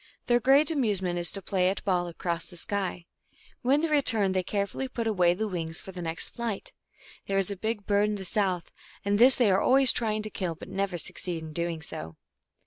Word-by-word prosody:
Their 240 Hz, 0 st, +3 dB
great 275 Hz, +6 st, +4 dB
amusement 200 Hz, -, 0 dB
is 170 Hz, -, -1 dB
to 195 Hz, -, -7 dB
play 185 Hz, -1 st, +1 dB
at 195 Hz, -, -4 dB
ball 180 Hz, -3 st, +1 dB
across 170 Hz, 0 st, -4 dB
the 175 Hz, -, -13 dB
sky. 185 Hz, -2 st, -3 dB, 0.6 s
1 250 Hz, -, 0 dB
When 285 Hz, +2 st, +4 dB
they 330 Hz, -, +1 dB
return 240 Hz, -10 st, +3 dB
they 185 Hz, 0 st, +1 dB
carefully 200 Hz, +7 st, -2 dB
put 235 Hz, -3 st, -4 dB
away 180 Hz, -5 st, +3 dB
their 220 Hz, +3 st, -2 dB
wings 165 Hz, -4 st, -2 dB
for 190 Hz, -, -9 dB
their 180 Hz, -1 st, -8 dB
next 165 Hz, -1 st, -1 dB
flight. 235 Hz, -4 st, -4 dB, 0.5 s
There 195 Hz, -, 0 dB
is 195 Hz, 0 st, 0 dB
a -, -, -3 dB
big 215 Hz, +1 st, -3 dB
bird 205 Hz, 0 st, +2 dB
in 210 Hz, -, -1 dB
the 195 Hz, -2 st, -6 dB
south, 185 Hz, -3 st, -1 dB, 0.3 s
and 205 Hz, +1 st, +1 dB
this 255 Hz, +3 st, +7 dB
they 235 Hz, -6 st, +3 dB
are 190 Hz, -, +3 dB
always 265 Hz, -1 st, +7 dB
trying 215 Hz, -2 st, -1 dB
to 215 Hz, -, -5 dB
kill, 180 Hz, -4 st, -3 dB
but -, -, -11 dB
never 195 Hz, -2 st, -2 dB
succeed 170 Hz, 0 st, -1 dB
in 155 Hz, -1 st, -8 dB
doing 170 Hz, -1 st, -3 dB
so. 80 Hz, -, -6 dB
195 Hz, 225 wpm, -27 LUFS, 175-220 Hz, 0.6 s, this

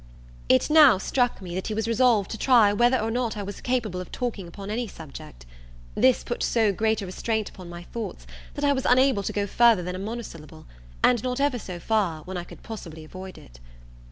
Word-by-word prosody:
It 130 Hz, -, +3 dB
now 295 Hz, -9 st, +8 dB
struck 245 Hz, +1 st, 0 dB
me 175 Hz, -2 st, -7 dB
that 185 Hz, +1 st, -3 dB
he 215 Hz, -, -3 dB
was 220 Hz, 0 st, -1 dB
resolved 230 Hz, -3 st, +3 dB
to 220 Hz, -, -4 dB
try 230 Hz, -6 st, +5 dB
whether 240 Hz, +4 st, +3 dB
or 225 Hz, 0 st, -2 dB
not 235 Hz, -2 st, -1 dB
I 205 Hz, -, -3 dB
was 200 Hz, 0 st, -7 dB
capable 225 Hz, -8 st, -1 dB
of 180 Hz, -, -10 dB
talking 225 Hz, -7 st, -4 dB
upon 195 Hz, +4 st, -8 dB
any 235 Hz, +2 st, -2 dB
subject. 135 Hz, -, -11 dB, 0.5 s
This 260 Hz, -1 st, +3 dB
put 240 Hz, -, -4 dB
so 220 Hz, -4 st, +2 dB
great 220 Hz, +1 st, 0 dB
a -, -, -4 dB
restraint 220 Hz, +3 st, -2 dB
upon 180 Hz, -2 st, -12 dB
my 175 Hz, 0 st, -8 dB
thoughts, 225 Hz, +4 st, -7 dB, 0.3 s
that 290 Hz, -1 st, -1 dB
I 285 Hz, -, +4 dB
was 265 Hz, -1 st, -3 dB
unable 255 Hz, -3 st, +4 dB
to -, -, -3 dB
go 205 Hz, -1 st, -1 dB
further 225 Hz, -2 st, +4 dB
than 180 Hz, +1 st, -4 dB
a -, -, -5 dB
monosyllable, 200 Hz, -8 st, -8 dB, 0.4 s
and 245 Hz, -3 st, +4 dB
not 250 Hz, +1 st, -2 dB
ever 280 Hz, -3 st, +1 dB
so 180 Hz, -4 st, -7 dB
far, 180 Hz, -6 st, 0 dB
when 185 Hz, +3 st, -7 dB
I 175 Hz, -, -3 dB
could -, -, -14 dB
possibly 165 Hz, -8 st, -8 dB
avoid 185 Hz, +4 st, -10 dB
it. -, -, -15 dB
215 Hz, 215 wpm, -25 LUFS, 185-240 Hz, 0.5 s, now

